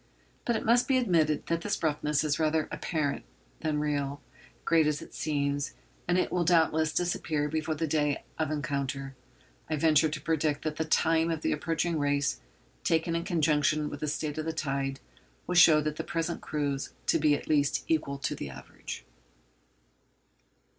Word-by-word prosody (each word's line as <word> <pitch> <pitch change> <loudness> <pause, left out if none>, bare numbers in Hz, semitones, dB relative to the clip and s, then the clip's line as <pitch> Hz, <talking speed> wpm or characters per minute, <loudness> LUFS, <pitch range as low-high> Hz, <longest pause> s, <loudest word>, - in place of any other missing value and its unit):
But 235 - +1
it - - -2
must 240 +2 +4
be 265 - +3
admitted 165 - +2
that 165 0 -1
this 200 -2 -2
roughness 150 -1 +1
is 150 0 0
rather 155 0 +1
apparent 150 -4 -2 0.4
than 155 -2 -1
real, 145 -1 -1 0.5
great 160 -2 +4
as 150 -1 0
it - - -12
seems, 145 -1 -1 0.3
and 175 +1 +2
it - - +1
will 180 - +1
doubtless 160 -2 +3
disappear 155 -3 0
before 155 +1 -2
the 160 +2 -1
day 150 -2 0 0.2
of 155 -2 0
encounter. 140 -3 -3 0.5
I 155 - +1
venture 155 0 +4
to 150 0 -4
predict 155 -1 0
that 155 -1 -3
the 160 - 0
'time' 160 +1 +2
of 165 -2 -2
the - - 0
approaching 165 +1 -1
race, 145 - 0 0.4
taken 165 +1 +1
in 170 +1 -2
conjunction 155 -3 +2
with 145 - -6
the 150 - -2
state 150 0 -2
of 155 - -3
the 160 - -2
tide, 135 -3 -2 0.5
will 180 - -2
show 165 -3 +7
the 150 +1 -1
present 165 0 -2
crews 145 -2 -2
to 165 - +3
be 150 -1 +4
at - - -7
least 145 -2 +2
equal 150 -3 0
to 140 - -2
the - - -6
average. - - -9
155 Hz, 175 wpm, -29 LUFS, 145-165 Hz, 0.5 s, show